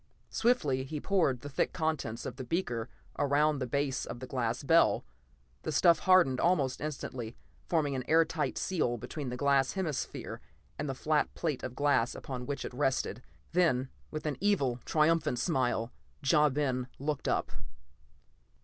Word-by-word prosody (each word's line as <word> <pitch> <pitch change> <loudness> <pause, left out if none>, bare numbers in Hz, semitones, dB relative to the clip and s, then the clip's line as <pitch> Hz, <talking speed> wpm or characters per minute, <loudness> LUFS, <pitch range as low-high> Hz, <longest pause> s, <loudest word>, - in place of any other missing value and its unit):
Swiftly 150 - +2
he 150 +3 -5
poured 155 -9 +1
the 145 - -7
thick 140 - 0
contents 150 -8 -2
of - - -5
the 130 - -5
beaker 125 -6 -2 0.3
around 145 +1 +3
the 130 - -2
base 140 +1 0
of 120 - -6
the 130 - -6
glass 125 0 -2
bell. 165 +4 +4 0.6
The - - -3
stuff 170 +4 +5
hardened 180 -9 +4
almost 145 -9 +2
instantly, 130 -6 -5 0.3
forming 155 -4 +1
an 130 - -2
air 165 +1 +5
tight 155 -2 -2
seal 150 -10 0
between 140 +4 -5
the 125 - -4
glass 140 -1 +3
hemisphere 165 -8 -3 0.4
and 150 - -2
the 135 - -2
flat 150 +3 +1
plate 155 -6 -2
of 125 - -5
glass 140 -5 +2
upon 125 -2 -6
which 140 -1 -3
it - - -6
rested. 130 -4 0 0.3
Then, 145 -8 +2 0.2
with 155 -1 -5
an 150 -4 -1
evil, 140 -12 +2
triumphant 155 -4 +2
smile, 120 -5 0 0.3
Ja 150 +2 +5
Ben 130 -3 -1
looked 145 0 -2
up. - - 0
140 Hz, 160 wpm, -31 LUFS, 130-155 Hz, 0.6 s, stuff